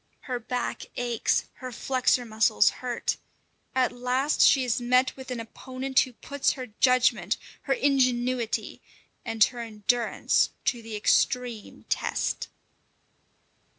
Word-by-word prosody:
Her 250 -2 -4
back 245 +1 -4
aches, 240 -2 0
her 255 0 -7
flexor 255 0 +1
muscles 220 - +3
hurt. 245 -2 -2 0.6
At 260 -1 +2
last 250 +4 0
she 270 -2 +6
has 245 -1 0
met 250 +2 +2
with 265 -1 -10
an 250 -2 -3
opponent 255 +3 -2
who 255 - +1
puts 280 +3 -1
her 260 -2 -6
judgment, 240 -7 +3 0.3
her - - +5
ingenuity, 255 -4 0 0.4
and 225 -1 +3
her 245 +2 0
endurance 230 +1 +1 0.2
to 240 - 0
the 225 -1 -7
extreme 235 +1 0
test. - - -1
250 Hz, 120 wpm, -27 LUFS, 230-255 Hz, 0.6 s, she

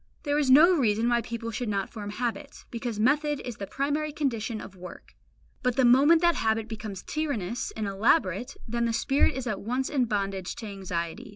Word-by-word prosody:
There 290 0 +1
is 285 -3 +1
no 310 +8 +8
reason 225 -5 +2
why 240 0 +2
people 230 0 -5
should 230 +1 -3
not 200 -2 -2
form 210 -3 -6
habits, 230 -1 -4
because 235 -2 -4
method 290 +5 +2
is 245 -3 -6
the 200 - -6
primary 295 +5 -1
condition 240 -7 -2
of 195 - -10
work; 180 0 -11 0.5
but 250 -1 0
the 260 - +3
moment 285 +7 +6
that 345 0 +5
habit 220 -5 0
becomes 215 -3 -7
tyrannous 245 - -3
and 215 - -2
elaborate, 205 - +1
then 235 +1 -1
the 230 - 0
spirit 270 +4 +2
is 265 -1 -4
at 215 -5 -3
once 250 +5 -2
in 265 -4 +2
bondage 195 -4 -2
to 225 - -8
anxiety. 185 -4 -5
235 Hz, 195 wpm, -27 LUFS, 210-270 Hz, 0.5 s, no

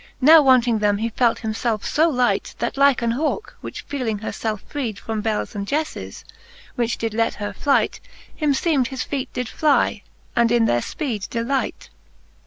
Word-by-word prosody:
Now 310 +4 +8
wanting 250 -4 +4
them 205 -1 +2
he 225 +2 -1
felt 235 +1 +1
himfelfe 220 -1 -2
fb 320 +2 +2
light, 250 -3 0
That - - -2
like 275 -2 +4
an 230 - +1
Hauke, 310 - -2
which - - -7
feeling 250 -7 -3
her 215 - -5
felfe 215 -2 -3
freed 240 -8 -4
From 220 0 -4
bels 215 +1 -2
and 200 -1 -4
jefles, 305 +5 -3 0.5
which 240 -1 -1
did 225 -1 -3
let 225 +1 0
her 205 -1 -5
flight, 280 +8 +1 0.4
Him 295 -3 +1
feem'd 275 -4 +1
his 260 0 -4
feet 270 -2 -4
did 250 -1 -3
fly, 300 +4 +1 0.3
and 235 -1 +3
in 235 -1 +4
their 120 - +2
Ipeed 225 - -4
delight, 250 +3 -2
XX. - - -35
240 Hz, 185 wpm, -22 LUFS, 220-275 Hz, 0.5 s, Now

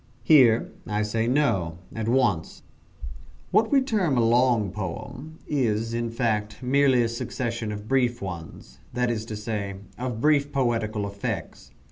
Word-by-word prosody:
Here 120 -4 +5 0.2
I 105 0 0
say 110 +2 -1
no, 115 - +1 0.2
at 110 -1 -3
once. 120 -9 +1 0.9
What 220 0 +3
we 275 -2 +5
term 200 - +1
a 115 - +3
long 120 -4 +3
poem 110 - -6
is, 115 -5 0
in 120 0 -1
fact, 110 -1 -2
merely 130 -1 +4
a - - +1
succession 115 -1 -3
of 105 0 -7
brief 125 -2 +1
ones 85 -4 -8
that 125 0 +1
is 110 -2 -3
to 110 - -6
say, 105 -2 -4 0.2
of 125 -3 -3
brief 145 +1 +3
poetical 115 -6 0
effects. 100 0 -5
115 Hz, 145 wpm, -25 LUFS, 105-130 Hz, 0.9 s, Here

